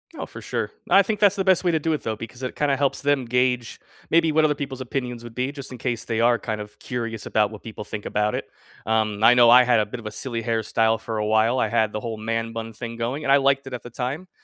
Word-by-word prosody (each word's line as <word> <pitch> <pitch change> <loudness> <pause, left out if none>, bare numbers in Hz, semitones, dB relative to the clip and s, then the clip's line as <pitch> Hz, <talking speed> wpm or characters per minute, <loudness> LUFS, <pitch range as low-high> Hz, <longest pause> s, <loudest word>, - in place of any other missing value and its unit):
Oh, - - -5
for - - -11
sure. - - -3 0.2
I 195 - +7
think 210 +1 -2
that's 200 -2 +5
the 195 - 0
best 185 -1 +3
way 175 - +4
to 160 - +1
do 160 +2 -1
it, 155 - -1
though, 110 - -3
because 115 +3 -9
it 130 - -4
kinda 145 -2 +1
helps 140 0 0
them 140 -2 +1
gauge 125 0 0 0.3
maybe 165 -1 +4
what 155 +1 +4
other 150 -1 +2
people's 135 -2 -5
opinions 125 -2 -4
would 115 -1 -10
be 125 +2 -1
just 140 -2 -9
in - - -7
case 120 -2 -3
they 115 -1 -1
are 120 0 +4
kind 110 -2 -4
of 105 0 -11
curious 115 -3 -4
about 105 -1 +1
what 110 - -10
people 110 -2 -8
think 105 0 -7
about 105 0 0
it. - - -3 0.4
Um, 110 -1 0
I 115 +2 +7
know 120 -1 +6
I 125 +2 +8
had 120 -3 +3
a - - 0
bit 115 +4 -7
of 115 - -12
a 110 - -4
silly 115 +2 -4
hairstyle 115 0 +1
for 110 -1 -5
a 105 - -1
while, 110 +4 +2
I - - +2
had 110 -1 +1
the 105 - -3
whole 115 0 -4
man 115 +1 -3
bun 115 0 -5
thing 115 +1 -7
going, 120 +6 -3
and 135 - +2
I - - +7
liked 135 0 +2
it 135 - -7
at 125 - -5
the 120 - -9
time. 135 +9 -4
120 Hz, 285 wpm, -23 LUFS, 110-135 Hz, 0.4 s, I